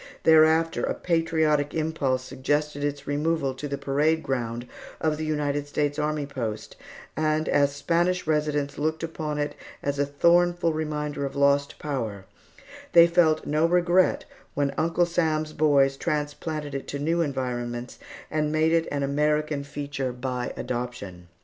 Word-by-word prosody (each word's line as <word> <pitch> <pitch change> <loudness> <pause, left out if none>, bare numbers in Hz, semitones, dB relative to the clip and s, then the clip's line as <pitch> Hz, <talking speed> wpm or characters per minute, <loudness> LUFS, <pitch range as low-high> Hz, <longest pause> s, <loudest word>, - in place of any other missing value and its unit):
Thereafter, 160 +1 +5
a - - -1
patriotic 160 -4 +1
impulse 155 -5 0
suggested 145 +3 -2
its 145 -1 -3
removal 145 -1 0
to 140 +3 -6
the 140 0 -3
parade 150 +4 +1
ground 120 -2 -3 0.3
of 155 -1 0
the 155 - -3
United 145 -2 -1
States 145 0 -1
Army 150 -1 -1
post, 115 -6 -5 0.4
and 155 0 0
as 140 0 +2
Spanish 175 +4 +1
residents 150 -2 0
looked 160 +2 -1
upon 155 -2 -3
it 145 0 -1 0.3
as 140 0 -1
a 145 - +3
thornful 170 +3 +3
reminder 150 -2 -3
of 135 -1 -4
lost 140 0 +2
power 115 -10 -4 0.7
they 170 -1 +9
felt 170 -2 +3
no 155 +2 +2
regret 180 +1 +3 0.3
when 140 -1 0
Uncle 165 +3 +2
Sam's 155 -3 0
boys 140 -3 +3
transplanted 150 -1 -3
it 135 - -5
to 140 - -4
new 165 +4 0
environments 125 -4 -3 0.3
and 150 -1 0
made 155 +1 +2
it 165 0 +2
an 140 -1 -1
American 150 +1 0
feature 140 -2 -4
by 125 0 -3
adoption. 120 -8 -5
150 Hz, 145 wpm, -26 LUFS, 140-160 Hz, 0.7 s, they